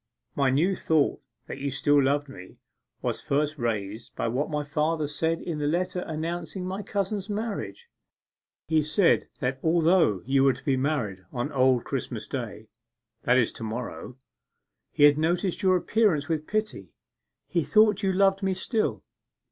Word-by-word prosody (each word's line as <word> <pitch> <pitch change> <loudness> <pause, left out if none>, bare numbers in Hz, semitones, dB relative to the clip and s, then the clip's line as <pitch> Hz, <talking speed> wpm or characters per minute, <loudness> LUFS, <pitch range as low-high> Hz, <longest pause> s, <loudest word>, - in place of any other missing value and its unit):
My 140 -2 +2
new 165 +9 +2
thought 160 -4 +1 0.2
that - - -7
you 140 +1 -2
still 145 +2 +3
loved 145 +2 +1
me 95 -9 -12 0.5
was - - -2
first 150 +1 -1
raised 110 -1 -3
by 115 - -1
what 130 +6 -1
my 150 -1 -2
father 155 +1 0
said 160 +3 -1
in 160 -3 -4
the 145 - 0
letter 180 +3 -1
announcing 165 +3 -4
my 190 +2 -3
cousin's 200 0 -3
marriage. 220 - -4 0.8
He 160 -1 +3
said 165 +5 +2
that 130 0 -1
although 165 - +3
you 135 +1 +3
were 135 -1 +5
to 130 - -13
be 135 - +2
married 130 -9 -1
on 125 +4 -3
Old 130 -3 +3
Christmas 125 -4 -4
Day 110 -5 -6 0.6
that 125 +1 +4
is 120 -3 +2
to - - -9
morrow 125 +2 -6 0.7
he - - +1
had 145 0 +7
noticed 175 +3 0
your 185 -1 +4
appearance 180 -7 +1
with 155 -2 -2
pity: 215 0 -3 0.5
he 170 -3 0
thought 210 +6 +4
you 195 -2 +1
loved 195 +1 +3
me 190 -1 0
still. 215 +4 -1
150 Hz, 165 wpm, -26 LUFS, 135-180 Hz, 0.8 s, had